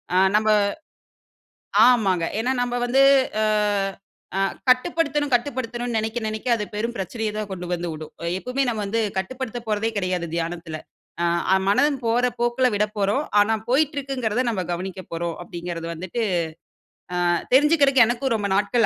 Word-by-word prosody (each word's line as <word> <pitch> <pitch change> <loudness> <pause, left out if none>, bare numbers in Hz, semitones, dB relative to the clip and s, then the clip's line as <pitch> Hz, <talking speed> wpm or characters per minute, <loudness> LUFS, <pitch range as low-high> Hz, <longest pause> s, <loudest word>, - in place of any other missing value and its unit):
ஆ - - +4 0.2
நம்ப 215 0 +1 1.4
ஆமாங்க. 195 -9 +3 0.2
ஏனா, 250 +3 +1
நம்ப 245 0 -2
வந்து 265 +3 +4 0.4
அ - - +3 0.9
அ - - +1 0.3
கட்டுப்படுத்தணும் 290 +2 +2
கட்டுப்படுத்தணும்னு 240 -2 -2
நனைக்க 220 +2 -2
நனைக்க 215 +3 -4
அது 210 - -3
பெரும் 230 +3 -2
பிரச்சனைய 215 +3 -3
தான் 215 -1 -3
கொண்டு 180 -1 -5
வந்து 175 0 -4
உடும். 155 0 -9 0.3
எப்பவுமே 250 +6 -2
நம்ம 220 -3 -1
வந்து 230 +3 0 0.2
கட்டுப்படுத்தப் 240 +3 -4
போறதே 215 +1 0
கிடையாது, 185 -2 -1
தியானத்துல. 165 -1 -4 0.8
ஆ - - +7
மனம் 275 +6 +3
போற 235 +2 +2
போக்குல 240 +2 +2
விடப்போறோம். 210 +5 0 0.2
ஆனா, 220 +2 +3
போய்ட்டு 290 +3 +2
இருக்குங்கிறத 255 -4 -1
நம்ம 195 -5 -2
கவனிக்கப் 185 +1 -6
போறோம் 170 0 -2
அப்டிங்கிறது 170 -1 -6
வந்துட்டு. 185 +8 -4 1.1
ஆ - - +4 0.2
தெரிஞ்சுக்கற்கு 280 -2 +5
எனக்கும் 240 +1 0
ரொம்ப 205 -2 -1
நாட்கள் 210 +3 +2
225 Hz, 140 wpm, -23 LUFS, 190-255 Hz, 1.4 s, ஆ